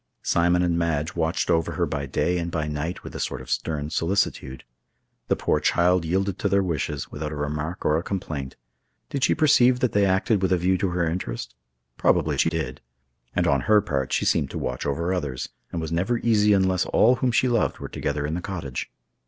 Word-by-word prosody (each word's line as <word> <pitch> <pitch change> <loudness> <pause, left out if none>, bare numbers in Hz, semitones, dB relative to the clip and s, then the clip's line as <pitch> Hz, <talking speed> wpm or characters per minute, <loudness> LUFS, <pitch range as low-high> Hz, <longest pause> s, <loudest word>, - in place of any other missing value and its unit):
Simon 85 +1 +2
and 85 -1 +1
Madge 80 -2 -1
watched 85 +1 0
over 80 -1 +1
her - - 0
by 70 0 -3
day 90 +6 0
and 85 0 -3
by 80 -2 -2
night 75 +4 -4
with - - -9
a - - -4
sort - - -2
of 65 0 -9
stern 75 +2 -2
solicitude. 85 -8 -1 0.6
The - - +2
poor - - +1
child 90 0 +2
yielded 95 +3 -1
to 100 - 0
their 100 0 +3
wishes, 75 -5 -3
without 75 0 -4
a - - -4
remark 75 +4 -4
or 75 +1 +3
a - - -3
complaint. 80 -8 -4 0.6
Did 140 -2 -2
she - - +4
perceive 130 -5 +4
that 125 - +2
they 100 - +3
acted 95 +2 +2
with 95 - +1
a 90 - +4
view 90 +2 +2
to 95 - 0
her 85 -1 0
interest? 80 -8 -4 0.4
Probably - - +2
she - - +4
did. 80 -6 -4 0.5
And 90 - +2
on 70 -5 +2
her 105 -1 +7
part, 70 -8 -2
she - - +1
seemed - - +2
to - - -6
watch 65 +3 -3
over 85 +6 -1
others, 70 -8 -3 0.2
and 85 - -3
was 80 -1 -4
never 95 +9 +1
easy 105 -3 +3
unless 95 -2 +2
all 125 +3 +4
whom 125 0 +1
she 130 - +3
loved 120 -3 +1
were - - -6
together 75 0 -3
in 75 - -2
the 90 - -2
cottage. 85 -10 -5
85 Hz, 215 wpm, -24 LUFS, 75-95 Hz, 0.6 s, her